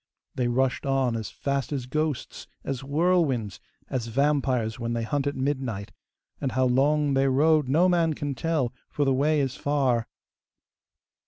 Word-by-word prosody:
They 125 -2 0
rushed 130 +2 +1
on 135 -3 +1
as 110 -2 -4
fast 140 0 -2
as 135 -4 -2
ghosts, 155 +1 -3 0.2
as 135 -2 -3
whirlwinds, 140 - +1 0.3
as 120 -3 -3
vampires 130 -3 +1
when 115 0 -2
they 115 -1 -1
hunt 140 +5 -1
at 145 - -1
midnight, 130 -7 -2 0.5
and 135 -3 -1
how 130 0 +2
long 140 +3 +2
they 135 0 +3
rode 150 +1 +3
no 165 +7 +4
man 170 -3 +2
can 145 -1 -3
tell, 135 -2 -1 0.2
for 145 - 0
the 135 - +3
way 150 +3 +2
is 135 -2 -1
far. 135 -5 +1
135 Hz, 160 wpm, -26 LUFS, 125-145 Hz, 0.5 s, no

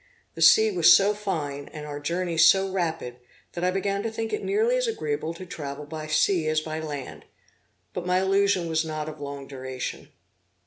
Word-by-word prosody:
The - - -8
sea 440 0 +7
was 370 - +6
so 200 +1 +2
fine, 155 -9 -4
and 150 -1 -8
our 145 -1 -6
journey 170 +3 -2
so 190 +4 +5
rapid, 165 -9 -3 0.4
that 175 - -4
I 180 - +3
began 195 +1 -1
to 225 - -2
think 225 0 -4
it 425 - -2
nearly 440 +5 +2
as - - 0
agreeable 155 - -3
to 185 - -9
travel 145 -3 -7
by 155 +1 -7
sea 160 +1 +2
as 155 0 +2
by 155 0 -5
land; 145 -4 -7 0.7
but 180 0 -5
my 180 0 +3
illusion 195 -2 +2
was 160 0 +1
not 155 -1 -4
of 155 -1 -8
long 140 -1 -6
duration. 130 -1 -6
165 Hz, 190 wpm, -25 LUFS, 150-195 Hz, 0.7 s, sea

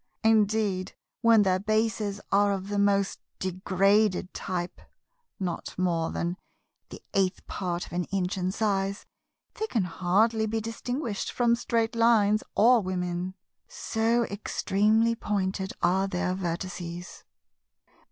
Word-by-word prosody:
Indeed 210 -3 +2 0.3
when 230 -2 +6
their 185 -1 +2
bases 215 -1 0
are 200 0 +4
of 195 0 -5
the 205 0 -1
most 200 -1 +2 0.2
degraded 190 +1 +1
type 180 -1 -4 0.6
(not 180 -3 -4
more 170 -3 0
than 175 +2 -2 0.5
the - - -11
eighth 190 -1 0
part 180 -2 -3
of - - -13
an 175 0 -1
inch 190 -1 -1
in 185 -1 -1
size), 200 -1 -1 0.5
they 440 - -3
can 225 - 0
hardly 205 +6 +1
be 225 +1 -1
distinguished 230 +1 -3
from 235 -1 +2
Straight 230 -1 -1
lines 220 -2 +4
or 235 +2 +6
Women; 180 -1 -3 0.3
so 230 +1 0
extremely 215 +2 +1
pointed 195 -3 -2
are 190 +2 +3
their 180 -1 -1
vertices. 175 -1 -5
200 Hz, 125 wpm, -27 LUFS, 185-220 Hz, 0.6 s, when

